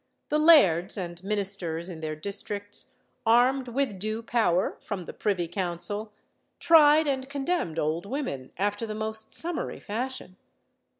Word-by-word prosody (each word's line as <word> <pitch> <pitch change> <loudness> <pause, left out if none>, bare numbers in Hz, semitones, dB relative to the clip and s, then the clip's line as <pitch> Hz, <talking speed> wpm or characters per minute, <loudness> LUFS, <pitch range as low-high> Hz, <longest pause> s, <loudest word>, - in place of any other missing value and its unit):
The 300 - +2
lairds 205 - +5
and 175 -1 -5
ministers 195 -5 +1
in 175 -4 -7
their 155 -1 -4
districts, 205 +7 -3 0.3
armed 250 +3 +3
with 240 -5 -1
due 215 +3 -3
power 220 -7 +1
from 190 -4 -5
the - - -8
privy 185 -5 -1
council, 190 +4 -4 0.5
tried 315 -1 +6
and 265 -2 -2
condemned 280 - -2
old 160 +4 -1
women 205 - -4
after 205 +3 -1
the 215 - -5
most 220 0 -4
summary 340 0 -4
fashion. 230 -4 -5
210 Hz, 135 wpm, -27 LUFS, 180-260 Hz, 0.5 s, tried